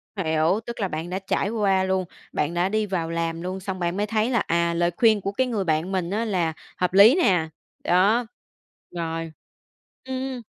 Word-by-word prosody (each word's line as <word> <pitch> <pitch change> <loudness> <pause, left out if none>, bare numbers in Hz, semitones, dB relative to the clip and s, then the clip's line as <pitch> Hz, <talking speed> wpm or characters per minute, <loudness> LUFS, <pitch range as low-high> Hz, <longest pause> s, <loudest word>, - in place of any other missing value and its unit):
Hiểu, 165 +2 +1
tức 235 -1 -7
là 195 - 0
bạn 160 +1 -5
đã 185 +1 -2
trải 195 +1 -1
qua 195 -4 +2
luôn, 190 -1 0 0.3
bạn 150 +3 -1
đã 175 +2 +1
đi 215 0 0
vào 175 -4 -2
làm 165 0 -2
luôn, 185 +2 -4
xong 185 -1 -5
bạn 175 +2 -1
mới 205 - +1
thấy 220 +2 +1
là, 235 -4 +2
à, 170 -1 +1
lời 175 +1 +1
khuyên 220 -3 +4
của 195 - -2
cái 260 +5 0
người 215 -5 -1
bạn 160 +2 0
mình 180 -2 -1
á 220 +4 -1
là 175 -6 0 0.2
hợp 180 0 0
lý 210 - +8
nè. 180 - +2 0.3
Đó. 205 +7 +3 0.7
Rồi. 165 -1 -4 0.7
Ừm. 260 -1 -4
190 Hz, 200 wpm, -24 LUFS, 170-215 Hz, 0.7 s, lý